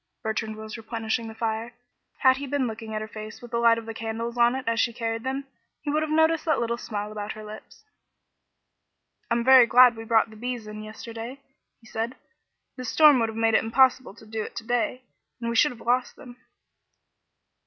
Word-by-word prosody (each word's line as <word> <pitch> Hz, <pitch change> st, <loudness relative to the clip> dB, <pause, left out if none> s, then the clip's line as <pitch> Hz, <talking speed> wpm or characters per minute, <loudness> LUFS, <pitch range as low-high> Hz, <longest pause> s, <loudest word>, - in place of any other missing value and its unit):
Bertrand 220 Hz, 0 st, -2 dB
was 215 Hz, +1 st, -8 dB
replenishing 225 Hz, 0 st, -3 dB
the 220 Hz, -, -9 dB
fire. 225 Hz, +1 st, -3 dB, 0.5 s
Had 260 Hz, 0 st, +5 dB
he 280 Hz, +1 st, -5 dB
been 280 Hz, -1 st, 0 dB
looking 220 Hz, -1 st, -5 dB
at 215 Hz, -, -2 dB
her -, -, -7 dB
face 215 Hz, 0 st, -9 dB
with 240 Hz, -1 st, -12 dB
the 235 Hz, -, 0 dB
light 230 Hz, -1 st, +5 dB
of 230 Hz, -, -6 dB
the 225 Hz, -, -6 dB
candles 230 Hz, +1 st, -4 dB
on 240 Hz, +1 st, +4 dB
it 265 Hz, -3 st, -5 dB
as 230 Hz, 0 st, +1 dB
she 235 Hz, -, +2 dB
carried 225 Hz, -1 st, -3 dB
them, 270 Hz, +1 st, -3 dB, 0.4 s
he 290 Hz, -, -2 dB
would 305 Hz, +1 st, +1 dB
have 310 Hz, -, -2 dB
noticed 320 Hz, 0 st, +3 dB
that 315 Hz, -, +2 dB
little 235 Hz, 0 st, -1 dB
smile 210 Hz, -2 st, -5 dB
about 210 Hz, 0 st, -5 dB
her 215 Hz, -, -10 dB
lips. 215 Hz, -, -12 dB, 1.4 s
"I'm 235 Hz, 0 st, +1 dB
very 260 Hz, -1 st, +8 dB
glad 250 Hz, 0 st, +7 dB
we 225 Hz, -, -7 dB
brought 225 Hz, 0 st, +2 dB
the -, -, -13 dB
bees 240 Hz, 0 st, -5 dB
in 215 Hz, 0 st, -8 dB
yesterday," 230 Hz, +4 st, -8 dB, 0.4 s
he 230 Hz, -, -23 dB
said. 225 Hz, +3 st, -4 dB, 0.6 s
"This 255 Hz, -2 st, -4 dB
storm 300 Hz, 0 st, +6 dB
would 225 Hz, -1 st, +1 dB
have 220 Hz, -, -7 dB
made 225 Hz, 0 st, +2 dB
it -, -, +4 dB
impossible 255 Hz, -1 st, +3 dB
to 220 Hz, -, -16 dB
do 220 Hz, 0 st, -4 dB
it -, -, -7 dB
to 225 Hz, -, -6 dB
day, 245 Hz, +2 st, -1 dB, 0.4 s
and 235 Hz, -1 st, -2 dB
we -, -, -3 dB
should 300 Hz, +6 st, +4 dB
have 240 Hz, -, -12 dB
lost 245 Hz, +1 st, 0 dB
them." 245 Hz, -3 st, -13 dB
230 Hz, 215 wpm, -26 LUFS, 220-250 Hz, 1.4 s, very